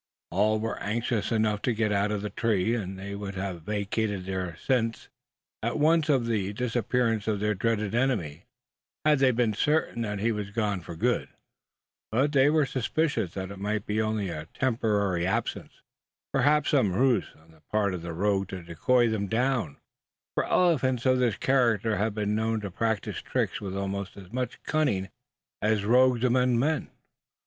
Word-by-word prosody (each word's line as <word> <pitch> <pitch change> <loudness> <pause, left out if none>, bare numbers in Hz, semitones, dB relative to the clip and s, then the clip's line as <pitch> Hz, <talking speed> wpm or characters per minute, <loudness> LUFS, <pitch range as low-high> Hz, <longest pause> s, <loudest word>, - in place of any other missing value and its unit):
All 105 +4 +2
were 115 +1 -3
anxious 115 +1 -1
enough 110 -2 +1
to 125 - +1
get 110 -1 +1
out 100 0 +1
of 105 -1 -2
the 105 - -4
tree; 110 -2 +1
and 95 -5 -3
they 100 +1 -6
would 100 -1 -5
have 95 -3 -4
vacated 105 0 -2
their 95 -3 -3
sents 115 -2 -1 0.5
at 115 +5 -1
once 155 +1 +3
on 135 -4 +3
the 105 -4 -1
disappearance 115 -1 0
of 105 -2 0
their 105 +1 +1
dreaded 105 0 -1
enemy, 105 - 0 0.6
had 150 -2 +4
they 135 -1 +5
been 120 -3 +1
certain 145 0 +1
that 105 -2 -2
he 110 +4 +1
was 105 -2 -3
gone 105 -3 -1
for 85 0 -8
good; - - 0 0.8
but 135 +6 +2
they 140 -1 +5
were 155 -1 +3
suspicious 135 - -1
that 95 0 -4
it 100 - -9
might 105 +1 -2
be 105 +1 0
only 110 -3 -1
a 80 -2 -6
temporary 105 -8 +1
absence 95 - -3 0.5
perhaps 145 +2 +3
some 120 -10 +3
ruse 120 0 +2
of 90 +4 -3
the 85 0 -5
rogue 95 +2 0
to 95 -2 -7
decoy 120 +9 +2
them 110 -3 -1
down: 115 - 0 0.6
for - - 0
elephants 130 -9 +2
of 130 -1 +4
this 120 -5 +1
character 115 -5 +2
have 105 0 0
been 105 -1 -1
known 110 +1 0
to 100 -2 -6
practise 110 +1 -2
tricks - - -2
with 95 -1 -4
almost 100 0 -4
as 95 +2 -12
much 125 0 -3
cunning 105 -12 0 0.5
as 105 -1 +1
rogues 125 +1 +4
among 125 -1 +3
men. 150 +6 0
110 Hz, 170 wpm, -27 LUFS, 100-125 Hz, 0.8 s, they